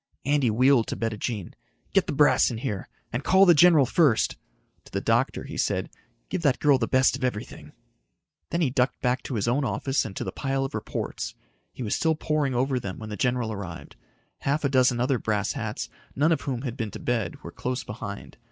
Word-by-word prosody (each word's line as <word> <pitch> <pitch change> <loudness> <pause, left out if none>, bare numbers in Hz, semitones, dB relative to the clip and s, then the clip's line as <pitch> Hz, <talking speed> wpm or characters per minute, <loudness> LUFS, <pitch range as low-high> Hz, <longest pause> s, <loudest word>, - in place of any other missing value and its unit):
Andy 145 -3 +2
wheeled 125 +2 +4
to - - -3
Bettijean. 110 -3 -3 0.4
"Get - - +3
the - - -1
brass - - +4
in 120 - -4
here. 110 -6 -4 0.2
And 120 +3 -2
call 190 +1 +6
the 175 - +7
general 160 -3 +6
first." 135 -5 +3 0.5
To - - -16
the - - -1
doctor, - - +1
he - - -7
said, - - -1 0.4
"Give 185 - -3
that 140 -5 +3
girl 145 -3 +4
the 115 - 0
best 130 0 +3
of 135 - -7
everything." 125 -5 -4 0.8
Then 170 - -1
he 140 -6 +2
ducked 130 0 +1
back 125 0 +1
to 130 - -5
his 105 0 -1
own 130 +5 +2
office 135 0 0
and 100 -3 -7
to - - -3
the - - -4
pile 135 -1 -1
of 135 - -6
reports. - - -4 0.4
He 130 - -7
was 105 - -1
still 160 -1 +2
poring 150 -4 0
over 130 +1 +1
them 100 -5 -6
when 110 - -8
the 105 - -4
general 120 +1 0
arrived. 85 -8 -8 0.4
Half 145 +3 0
a 140 - +2
dozen 130 -2 +3
other 125 0 +1
brass 105 -2 -1
hats, - - -4 0.3
none 150 +5 +3
of 165 - +1
whom 125 -3 -3
had 120 -4 -3
been 110 -5 -3
to - - -8
bed, 110 -9 -1
were - - -7
close 125 0 -3
behind. 105 -2 -7
125 Hz, 215 wpm, -26 LUFS, 110-140 Hz, 0.8 s, the